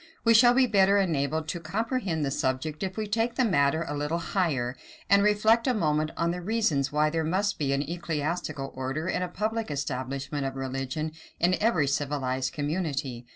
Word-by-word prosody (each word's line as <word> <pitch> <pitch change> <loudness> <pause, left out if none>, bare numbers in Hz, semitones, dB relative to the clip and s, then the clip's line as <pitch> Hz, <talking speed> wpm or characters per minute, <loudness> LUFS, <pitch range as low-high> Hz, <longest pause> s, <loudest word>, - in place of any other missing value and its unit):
We 230 - +5
shall 240 +2 +7
be 265 0 +5
better 200 -3 +4
enabled 160 -4 0
to 175 - -3
comprehend 190 - -2
the 135 - -2
subject 130 +4 -2
if 190 0 -3
we 215 - -1
take 225 +3 0
the 255 - +2
matter 160 -4 +2
a 145 - -3
little 150 +3 -1
higher, 150 -9 -1 0.4
and 200 0 +7
reflect 215 +4 +3
a 255 - +2
moment 155 -5 +1
on 170 0 +1
the 180 +1 -4
reasons 175 -9 0
why 150 +1 +2
there 165 0 0
must 195 +6 0
be 140 -3 0
an 140 +1 +1
ecclesiastical 155 -3 -3
order 135 +5 -3
and 185 - 0
a - - -2
public 215 +5 -2
establishment 135 0 -3
of 135 0 -3
religion 135 +4 -3 0.3
in 180 +2 +3
every 210 -9 +3
civilized 135 -2 -1
community. 145 -6 -3
160 Hz, 185 wpm, -27 LUFS, 140-200 Hz, 0.4 s, shall